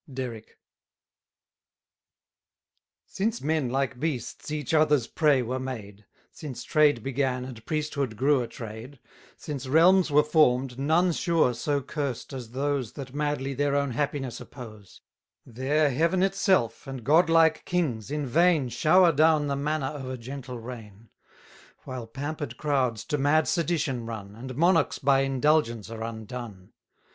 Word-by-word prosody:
DERRICK. 125 -4 -7 2.5
Since 220 +4 -2
men 155 -3 0
like 135 0 -1
beasts 145 -4 -4
each 150 -1 -3
other's 150 -5 +3
prey 145 -3 +2
were 130 +3 -3
made, 105 -6 -7 0.2
Since 130 -6 -8
trade 150 -7 +3
began, 130 -1 -1
and 120 -4 -10
priesthood 145 -7 -2
grew 135 +1 +3
a 120 - -4
trade, 115 +3 -9 0.4
Since 140 -4 -6
realms 170 +6 +5
were 150 +1 +5
form'd, 135 -5 +2
none 160 +6 +3
sure 165 -6 +2
so 140 +3 -1
cursed 140 -2 -4
as 125 -4 -7
those 135 -1 -2
That 135 -2 -8
madly 145 -2 -2
their 140 +1 0
own 140 -1 0
happiness 135 -1 -3
oppose; 110 -6 -12 0.4
There 140 +5 +1
Heaven 165 +7 +1
itself 190 - +1
and 135 -3 -6
god 160 +7 +4
like 165 -1 +4
kings, 135 - -1
in 150 0 -2
vain 160 0 +3
Shower 175 +7 +4
down 155 0 +3
the 140 - 0
manna 145 +1 -1
of 135 -4 -7
a 130 - -4
gentle 125 +1 -7
reign; 115 -3 -10 0.7
While 130 -3 -6
pamper'd 145 0 -5
crowds 130 -7 0
to 150 -3 -2
mad 145 +3 +3
sedition 150 -8 -1
run, 105 -3 -7
And 130 +3 -8
monarchs 165 +1 +3
by 135 0 +3
indulgence 135 -5 +1
are 115 -1 -7
undone. 110 -3 -7
135 Hz, 140 wpm, -27 LUFS, 125-155 Hz, 2.5 s, realms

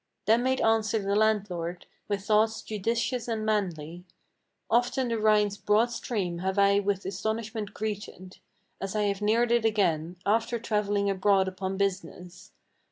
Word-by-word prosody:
Then 225 +3 +4
made 260 +1 0
answer 225 -1 +2
the 200 -1 -1
landlord, 195 -5 0 0.2
with 200 -1 -2
thoughts 220 +1 +2
judicious 230 +3 -2
and 220 -2 -2
manly: 175 -6 -2 0.6
"Often 245 +2 +1
the 230 -1 -1
Rhine's 210 -1 +3
broad 210 +4 +2
stream 200 -7 -3
have 190 +2 -2
I 200 0 +4
with 200 -1 -1
astonishment 220 +1 -4
greeted, 205 -3 -6 0.4
As 195 +1 -4
I 210 - +1
have 200 0 -1
neared 230 +3 +2
it 235 -1 +3
again, 180 -7 +1
after 230 +3 +1
travelling 210 -3 0
abroad 195 0 +2
upon 190 0 -4
business. 190 -1 -4
210 Hz, 145 wpm, -27 LUFS, 195-220 Hz, 0.6 s, Then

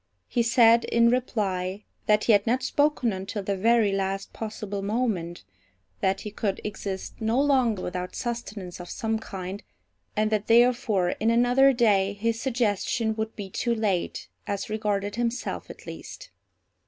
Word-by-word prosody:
He 240 - +1
said, 235 0 +5
in 235 0 +4
reply, 200 -6 -1 0.2
that 210 0 +4
he - - +4
had 205 0 +4
not 250 +3 +1
spoken 285 -4 +1
until 195 +2 -4
the 200 +1 -1
very 225 +1 +3
last 195 0 -2
possible 210 -2 -5
moment, 200 -5 -2 0.6
that 190 - 0
he 210 - -6
could 200 -1 -2
exist 200 -2 -5
no 225 +3 +1
longer 255 -8 +2
without 180 0 -4
sustenance 215 -7 -5
of 175 - -8
some 225 -1 -2
kind, 190 -1 -6 0.5
and 215 0 +1
that 210 -1 0
therefore 230 -6 +4
in 220 - +2
another 245 +3 +5
day 205 -6 +3
his 225 +2 -1
suggestion 230 -2 0
would 220 0 -3
be 205 -2 -6
too 235 +5 -1
late, 205 -5 -1 0.2
as 200 +2 -3
regarded 205 -1 -1
himself 240 +1 -2
at - - -11
least. - - -9
215 Hz, 155 wpm, -26 LUFS, 195-235 Hz, 0.6 s, said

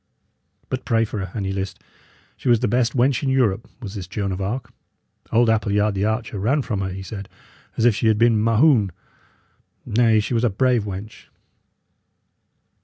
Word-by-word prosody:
"But - - -3
pray 115 0 +2
for 105 -2 -4
her, 95 - -7
an 100 - -2
ye 95 - -2
list; 95 0 -4 0.6
she - - -3
was 120 -2 +4
the - - +2
best 120 +2 +1
wench 125 +1 +2
in 135 - -1
Europe, 120 -6 +1
was 100 -3 -6
this 95 -5 -6
Joan 100 0 -3
of 95 +1 -4
Arc. 110 +7 -4 0.6
Old 120 +1 +4
Appleyard 105 -1 +2
the 100 +1 0
archer 110 -1 -2
ran 130 +8 +1
from 110 -5 -2
her, 95 - -2
he 95 +1 -6
said, 100 0 -7 0.5
as 115 - +2
if 120 - +6
she 110 - 0
had 110 -1 +3
been 115 -1 +3
Mahoun. 115 -1 +4 1.0
Nay, 110 0 +3
she 105 - -2
was 115 0 +1
a 120 - +4
brave 120 +2 +1
wench." 100 +2 -8
110 Hz, 185 wpm, -22 LUFS, 100-120 Hz, 1.0 s, if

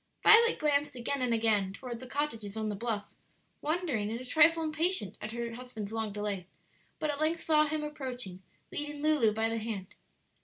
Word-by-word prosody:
Violet 460 +2 +7
glanced 290 -2 +1
again 255 +3 -1
and 250 -1 +1
again 215 -4 +2
toward 240 +1 -7
the 255 - -9
cottages 230 -7 -3
on 220 -1 -1
the 210 - -2
bluff, 215 -1 -2 0.6
wondering 300 - -1
and 230 +2 -3
a 255 - -8
trifle 320 +4 +5
impatient 310 - 0
at 215 - -5
her 235 0 -4
husband's 230 -4 -7
long 220 -2 -2
delay, 200 -3 -3 0.5
but 305 - -1
at 290 +1 -5
length 320 +2 +1
saw 305 -1 +4
him 305 0 -2
approaching, 250 -11 -6 0.3
leading 295 -3 -4
Lulu 300 -8 +4
by 220 +1 0
the 225 0 -1
hand. 215 -4 -5
245 Hz, 185 wpm, -31 LUFS, 215-300 Hz, 0.6 s, Violet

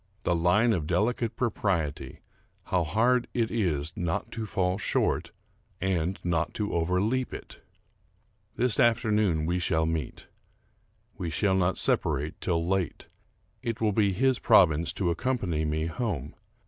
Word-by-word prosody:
The 85 - +1
line 105 +8 +3
of 80 -6 -2
delicate 110 +6 0
propriety, 95 - -2 0.2
— - - -39
how 90 -2 +3
hard 120 +9 +2
it 115 -2 0
is 80 -8 -1
not 85 -1 -2
to 110 -1 -4
fall 95 -2 0
short, - - 0 0.5
and 95 -1 0
not 85 -2 -1
to 105 -1 -2
overleap 95 +10 0
it! - - -11 0.9
This 120 -2 +1
afternoon 105 -8 +2
we 90 +2 0
shall 80 -1 +1
meet.... 80 -4 -3 0.9
We 85 - -2
shall 95 +5 +1
not 95 0 +2
sepa 75 - +1
rate 75 +3 -5
till 85 -2 0
late. 95 -3 -1 0.6
It 115 0 -3
will 110 -2 +1
be 100 -1 +3
his 130 +7 +2
province 85 -8 +4
to 90 -3 0
accompany 85 -5 -1
me 80 +1 -1
home. 85 - -3
90 Hz, 145 wpm, -28 LUFS, 80-110 Hz, 0.9 s, province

